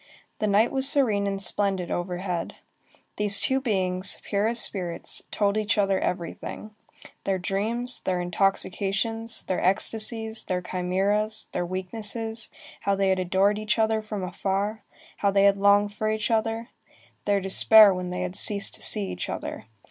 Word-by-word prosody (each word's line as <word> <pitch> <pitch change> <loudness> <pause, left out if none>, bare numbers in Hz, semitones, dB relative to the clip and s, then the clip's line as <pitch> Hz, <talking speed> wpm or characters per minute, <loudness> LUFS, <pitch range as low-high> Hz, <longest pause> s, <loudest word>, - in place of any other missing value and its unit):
The 215 - -1
night 210 +3 +2
was 270 0 +8
serene 215 -9 +3
and 195 0 -3
splendid 195 -1 0
overhead. 175 0 -4 0.6
These 210 -1 +8
two 265 0 0
beings, 185 -6 -1
pure 205 +1 -1
as 235 +1 -1
spirits, 180 -6 -2
told 205 0 0
each 215 +1 -1
other 195 -2 +1
everything, 180 +4 -5 0.5
their 195 -1 -1
dreams, 220 +7 -1
their 185 -1 -2
intoxications, 195 +5 -1
their 185 - -3
ecstasies, 220 +3 +1
their 180 -1 -3
chimæras, 200 +5 -2
their 175 -1 -3
weaknesses, 220 +4 -4 0.3
how 200 - -1
they 195 0 0
had 190 -1 +1
adored 195 +3 +1
each 215 0 -1
other 220 0 +1
from 215 -2 -6
afar, 200 +3 -3 0.4
how 200 - +1
they 195 0 +2
had 200 0 +4
longed 200 +1 +3
for 215 +1 -2
each 215 +1 -2
other, 225 +1 -1 0.6
their 200 -1 +1
despair 200 +2 +6
when 180 -1 -5
they 180 0 -4
had 180 0 -5
ceased 200 -1 +1
to - - -8
see 105 - 0
each 90 -1 -6
other. - - -6
200 Hz, 155 wpm, -25 LUFS, 185-220 Hz, 0.6 s, was